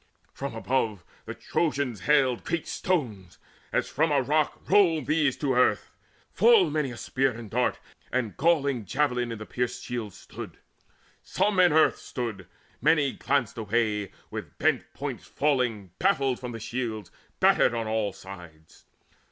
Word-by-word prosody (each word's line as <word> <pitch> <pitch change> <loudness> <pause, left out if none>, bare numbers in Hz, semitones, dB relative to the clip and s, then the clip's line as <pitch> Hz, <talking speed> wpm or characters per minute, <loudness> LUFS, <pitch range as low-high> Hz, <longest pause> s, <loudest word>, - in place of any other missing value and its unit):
From 140 -4 -5
above 115 -5 -1 0.2
The - - -5
Trojans 140 - -1
hailed 135 -5 +3
great 170 -1 -2
stones; 110 - -2 0.3
as - - 0
from 155 +2 +1
a 145 - +4
rock 150 +3 0
Rolled 165 -8 +4
these 150 -4 +1
to 140 -3 0
earth. 125 0 +2 0.4
Full 460 -6 +5
many 150 -3 0
a 120 - -8
spear 135 +2 0
and 115 -3 -8
dart 125 +1 +1 0.3
And 120 -5 -1
galling 140 -7 +1
javelin 125 -1 0
in 115 - -4
the 110 - -8
pierced 125 +1 -3
shields 115 -5 -5
stood; - - -9 0.6
Some 205 -2 0
in 180 -1 +7
the 155 - +3
earth 160 - +4
stood; 120 -5 -5 0.3
many 145 -1 +3
glanced 135 -5 -1
away 105 -2 0 0.2
With - - -7
bent - - +1
points - - -5
falling 125 - 0
baffled 135 -2 +2
from 125 -1 -6
the 115 - -6
shields 110 -3 -4 0.3
Battered 120 - +4
on 115 -1 -2
all 110 -2 0
sides. 85 -5 -13
125 Hz, 150 wpm, -27 LUFS, 110-150 Hz, 0.6 s, in